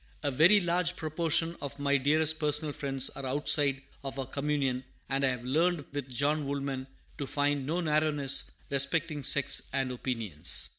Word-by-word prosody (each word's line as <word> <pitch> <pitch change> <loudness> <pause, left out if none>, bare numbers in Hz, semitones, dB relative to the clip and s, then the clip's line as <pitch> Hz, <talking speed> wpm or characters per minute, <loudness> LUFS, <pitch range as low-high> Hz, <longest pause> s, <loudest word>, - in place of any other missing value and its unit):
A 145 - 0
very 170 +10 +6
large 175 0 0
proportion 165 +1 +1
of 140 - -6
my 140 0 +1
dearest 155 +3 +2
personal 150 0 0
friends 135 -2 0
are 135 - -8
outside 140 0 +2 0.2
of 135 0 -6
our 135 - -3
communion; 135 -2 -2 0.3
and 135 0 0
I 135 - +4
have 125 -1 -4
learned 160 +3 +1
with 140 -2 -5
John 140 +3 0
Woolman 135 -1 -3 0.3
to 140 - -3
find 145 -1 -1
"no 170 +4 -1
narrowness 150 -3 +2 0.2
respecting 150 +2 +1
sects 140 +1 +2
and 135 -1 -1
opinions." 115 - -1
140 Hz, 160 wpm, -29 LUFS, 135-155 Hz, 0.3 s, very